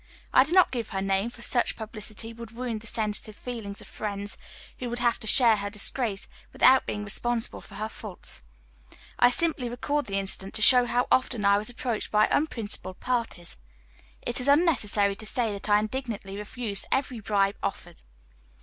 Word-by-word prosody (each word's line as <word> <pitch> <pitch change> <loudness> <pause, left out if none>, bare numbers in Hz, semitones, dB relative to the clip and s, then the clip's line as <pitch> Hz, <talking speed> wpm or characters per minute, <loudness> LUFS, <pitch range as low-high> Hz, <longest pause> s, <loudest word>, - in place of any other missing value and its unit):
I 260 - +7
do 310 - -7
not 370 0 +5
give 235 -4 -4
her 195 - -3
name, 195 +3 0
for 235 0 -12
such 240 - +2
publicity 220 0 -6
would 230 -1 -9
wound 230 -1 -4
the 230 - -8
sensitive 215 -1 -1
feelings 220 -5 -6
of - - -12
friends, 205 -1 -4 0.4
who 250 - -4
would 240 - -3
have 240 -1 +1
to 220 - -8
share 230 -2 +5
her 200 0 -3
disgrace, 210 0 0 0.2
without 260 0 +5
being 210 - -3
responsible 235 +3 0
for - - -13
her 215 +1 -3
faults. 210 -4 -7 0.8
I 245 - +7
simply 275 -3 +1
record 285 +5 -2
the 195 -1 -1
incident 195 0 -2
to 215 - +1
show 250 +1 +6
how 245 +1 +2
I - - +8
often 240 -4 -6
was 200 +2 +3
approached 240 -2 -3
by 215 0 +4
unprincipled 220 -10 -1
parties. 230 -8 -2 0.7
It 240 +1 -2
is 250 - -2
unnecessary 255 - +4
to 220 - -6
say 230 -2 +1
that 200 +1 -6
I 205 - +6
indignantly 215 -3 -4
refused 210 0 -4
every 260 -3 -1
bribe 200 -1 +1
offered. - - -5
225 Hz, 180 wpm, -27 LUFS, 205-245 Hz, 0.8 s, I